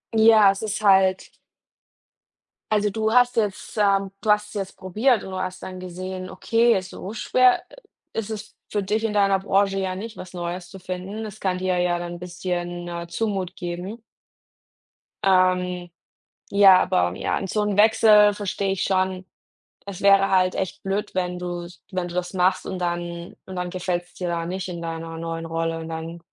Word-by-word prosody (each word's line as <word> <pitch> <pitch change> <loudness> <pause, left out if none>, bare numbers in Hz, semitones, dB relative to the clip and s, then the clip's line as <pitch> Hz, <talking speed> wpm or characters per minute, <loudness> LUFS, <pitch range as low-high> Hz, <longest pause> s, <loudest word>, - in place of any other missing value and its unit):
Ja, 220 -2 +7
es 195 - -6
ist 210 -2 -2
halt 190 -2 +4 1.4
Also, 210 -1 +2
du 220 +2 -1
hast 245 0 +4
jetzt, 210 0 -2
ähm, 195 -2 +2
du 215 - +3
hast's 210 0 +1
jetzt 195 -2 -5
probiert 215 +5 +1
und 190 - -8
du 185 - -4
hast 185 0 -4
dann 185 0 -7
gesehen, 185 +1 -6
okay, 230 -2 +2
so 185 +2 -8
schwer, 250 +3 +3
äh, - - -15 0.4
ist 225 -1 -3
es 215 -1 -7 0.2
für 205 - 0
dich 210 +3 -1
in 220 -2 0
deiner 195 -2 +3
Branche 195 0 +1
ja 190 -1 -2
nicht, 220 +4 -7
was 185 - -9
Neues 175 0 -5
zu 195 +2 -11
finden. 185 +4 -5
Es 215 0 -9
kann 185 -2 -1
dir 185 -1 0
ja 175 -1 +1
dann 175 0 -5
'n 175 - -8
bisschen, 175 0 -4
äh, 170 0 -5
Mut 190 0 -2
geben. 180 +6 -6 1.2
Ähm, 180 -2 +2 0.6
ja, 195 -2 +8
aber, 90 0 +1
ja, - - -1
und 195 - -5
so 210 - 0
'n 210 -1 0
Wechsel 210 -1 +6
verstehe 200 -1 -2
ich 195 - -2
schon. 185 -1 0 0.6
Es 200 -3 -7
wäre 195 0 +5
halt 185 -1 +3
echt 190 - -3
blöd, 195 +1 -2
wenn 180 -1 -1
du's 175 -1 -6
wenn 185 -2 -2
du - - -8
das 180 +1 -2
machst 185 0 +2
und 190 - -4
dann 175 0 -4
und 190 - -8
dann 180 0 -3
gefällt's 175 -1 -3
dir 180 - -4
da 170 -1 -2
nicht 185 +2 -4
in 175 -2 -6
deiner 165 0 -5
neuen 165 0 -4
Rolle 165 0 -2
und 160 0 -7
dann 165 +1 -6
185 Hz, 185 wpm, -23 LUFS, 175-205 Hz, 1.4 s, ja